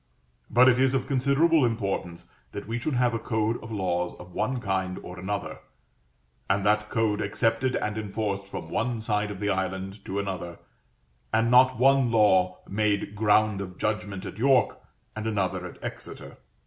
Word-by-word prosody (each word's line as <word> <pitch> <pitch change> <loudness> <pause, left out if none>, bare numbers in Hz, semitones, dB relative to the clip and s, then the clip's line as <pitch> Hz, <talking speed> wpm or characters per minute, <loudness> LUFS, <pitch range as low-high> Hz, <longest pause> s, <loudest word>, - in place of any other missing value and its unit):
But 125 +2 +6
it 125 -1 +5
is 130 0 +3
of 130 - 0
considerable 140 +4 +3
importance 100 -7 -2 0.2
that 100 - -6
we 115 +1 -2
should 135 +3 -2
have 125 -1 +2
a 115 - -1
code 110 0 -1
of 115 - -9
laws 90 -4 -1
of 90 0 -13
one 130 +6 -1
kind 95 -4 -2
or 90 0 -8
another, 100 +2 -4 0.9
and 95 0 +1
that 105 0 +2
code 110 -2 0
accepted 115 +4 0
and 105 +1 -2
enforced 100 -1 -3
from - - -7
one 120 0 -1
side 105 -1 0
of 100 -2 -7
the 105 0 0
island 95 +1 -3
to 95 - -4
another, 95 -4 -4 0.7
and 115 +1 +2
not 130 0 +6
one 135 0 +4
law 95 -5 +3
made 105 0 0
ground 105 -1 +2
of 90 -2 -7
judgment 105 -2 -2
at 105 - -8
York 130 -1 +3 0.4
and 110 0 -4
another 95 -4 -1
in - - -12
Exeter. - - -8
105 Hz, 170 wpm, -26 LUFS, 95-120 Hz, 0.9 s, But